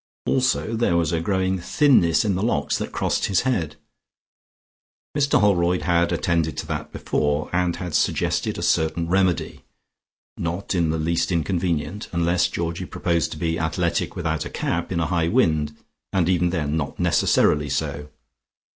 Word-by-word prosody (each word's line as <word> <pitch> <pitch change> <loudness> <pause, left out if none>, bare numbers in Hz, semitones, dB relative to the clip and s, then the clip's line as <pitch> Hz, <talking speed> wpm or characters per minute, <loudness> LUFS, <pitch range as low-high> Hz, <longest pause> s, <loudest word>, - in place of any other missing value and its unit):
Also 125 -3 +1
there 110 -7 +2
was 80 -3 +1
a 85 -1 0
growing 95 +1 0
thinness 100 - +3
in 100 - +1
the 95 - -2
locks 85 -10 0
that - - -4
crossed - - 0
his 95 -3 +2
head; 85 - -1 1.4
Mr 145 -1 +3
Holroyd 90 -3 +2
had 85 -1 +2
attended 80 -4 0
to - - -3
that 75 -1 -5
before, 75 0 -1
and 90 -1 +1
had 90 -3 -6
suggested - - 0
a - - -4
certain 80 +1 +1
remedy, 95 0 0 0.8
not 85 +5 -3
in 85 -3 +1
the 80 - 0
least 85 +3 0
inconvenient, 85 +1 -1
unless 85 +1 +2
Georgie 85 +2 -3
proposed 85 -2 -1
to - - -9
be 80 0 -1
athletic 80 -1 -1
without - - -2
a - - -6
cap, - - -2
in - - 0
a 80 - +1
high 85 0 0
wind, 80 - +1 0.3
and 90 -4 +1
even 90 -1 +2
then 80 -4 -1
not 75 -4 -3
necessarily 75 -1 +2
so. 75 +2 -3
85 Hz, 160 wpm, -23 LUFS, 80-95 Hz, 1.4 s, thinness